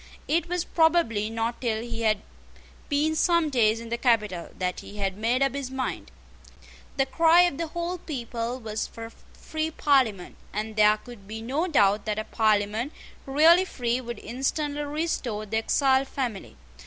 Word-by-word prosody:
It 335 +2 +1
was 355 -1 -1
probably 320 -11 +2
not 230 +1 -3
till 225 -3 -1
he 235 -1 -5
had 215 -2 +1 0.7
been 305 +2 +1
some 335 -2 +2
days 225 -3 +3
in 230 0 -8
the 235 +1 -2
capital 210 -8 +1
that 180 -1 -2
he 210 - -11
had 195 -2 -1
made 235 +6 +1
up 275 -2 +1
his 280 -2 -4
mind. 260 - -4 0.9
The 270 - +3
cry 330 +5 +5
of 350 -5 +1
the 335 - -1
whole 345 +2 -4
people 240 -5 -4
was 220 -2 -3
for 230 -1 -9
a 225 - -10 0.2
free 315 0 -3
Parliament; 260 - +1 0.2
and 215 +1 -3
there 210 0 +5
could 215 -3 -13
be 220 +1 -6
no 285 +9 -1
doubt 205 - +3
that 215 -1 -2
a 215 - -1
Parliament 215 +4 0 0.3
really 320 +6 +6
free 245 -8 -2
would 240 -2 -6
instantly 285 +5 -2
restore 290 -8 -2
the 220 +2 -2
exiled 265 +3 +2
family. 245 -9 -4
240 Hz, 170 wpm, -26 LUFS, 215-295 Hz, 0.9 s, really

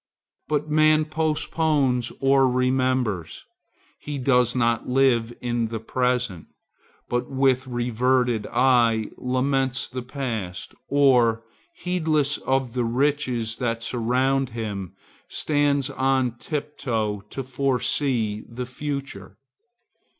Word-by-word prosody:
But 150 0 -1
man 155 0 +4
postpones 155 -5 0
or 135 -1 +4
remembers; 125 -7 0 0.5
he 145 -1 -5
does 125 -2 +2
not 115 -1 +1
live 125 -3 +3
in 120 -2 -1
the 110 0 -4
present, 125 -5 -1 0.6
but 120 0 -2
with 130 -1 +2
reverted 120 -1 +1
eye 120 -3 +3
laments 130 +1 0
the 130 0 -5
past, 120 -8 -5
or, 125 -5 +3 0.3
heedless 155 - 0
of 130 -3 -1
the 125 -1 0
riches 125 -2 0
that 115 -2 -2
surround 130 +3 +1
him, 100 -5 -4 0.3
stands 145 -3 +1
on 130 -2 +1
tiptoe 120 -9 -3
to 135 - -5
foresee 130 -4 -1
the 125 +1 -5
future. 135 -6 -6
125 Hz, 100 wpm, -24 LUFS, 115-140 Hz, 0.6 s, man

